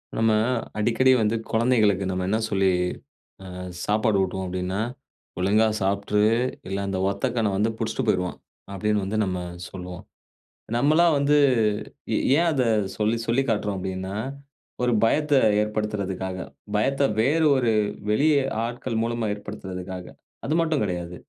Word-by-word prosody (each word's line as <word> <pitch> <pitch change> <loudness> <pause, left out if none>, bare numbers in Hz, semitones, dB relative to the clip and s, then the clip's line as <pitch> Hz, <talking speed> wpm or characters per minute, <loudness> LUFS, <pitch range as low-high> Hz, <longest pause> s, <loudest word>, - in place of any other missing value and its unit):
நம்ம 110 0 +3 0.5
அடிக்கடி 120 +4 +3
வந்து 110 +1 +1 0.2
கொழந்தைகளுக்கு 110 -4 +2
நம்ம 90 0 -2
என்ன 110 - +2
சொல்லி, 95 -1 +2 0.8
அ - - -8 0.3
சாப்பாடு 110 0 +2
ஊட்டுவோம் 95 0 -2
அப்பிடீன்னா, 90 +2 -2 0.6
"ஒழுங்கா 105 +4 +3
சாப்ட்டுரு! 100 +2 +1 0.4
இல்ல 95 +1 -3
அந்த 95 -1 -2
ஒத்த 100 +3 -2
கண்ணன் 110 -4 +1
வந்து 105 +3 +2
புடிச்சிட்டு 115 +3 -2
போயிருவான்." 90 -3 0 0.4
அப்பிடீன்னு 105 +1 0
வந்து 105 +3 -2
நம்ம 90 -1 -2 0.3
சொல்லுவோம். 90 -2 -8 0.7
நம்மல்லாம் 155 +6 +4
வந்து 140 +1 +3 0.8
எ - - +2 0.2
ஏன் 170 +1 +3
அத 135 -4 +1 0.3
சொல்லி 110 +2 +1
சொல்லி 120 +4 +2
காட்றோம் 105 -2 0
அப்பிடீன்னா, 95 +1 -4 0.7
ஒரு 125 - +2
பயத்த 150 +6 +2 0.3
ஏற்படுத்துறதுக்காக. 105 -3 -3 0.4
பயத்த 135 +6 +1 0.2
வேறு 150 +8 +3
ஒரு 120 -3 +2 0.4
வெளி 140 +9 +3 0.4
ஆட்கள் 120 -1 -3
மூலமா 115 -1 -1
ஏற்படுத்துறதுக்காக. 95 -2 -7 0.4
அது 155 - 0
மட்டும் 160 -3 0
கெடையாது. 90 -3 -3
105 Hz, 130 wpm, -24 LUFS, 95-120 Hz, 0.8 s, நம்மல்லாம்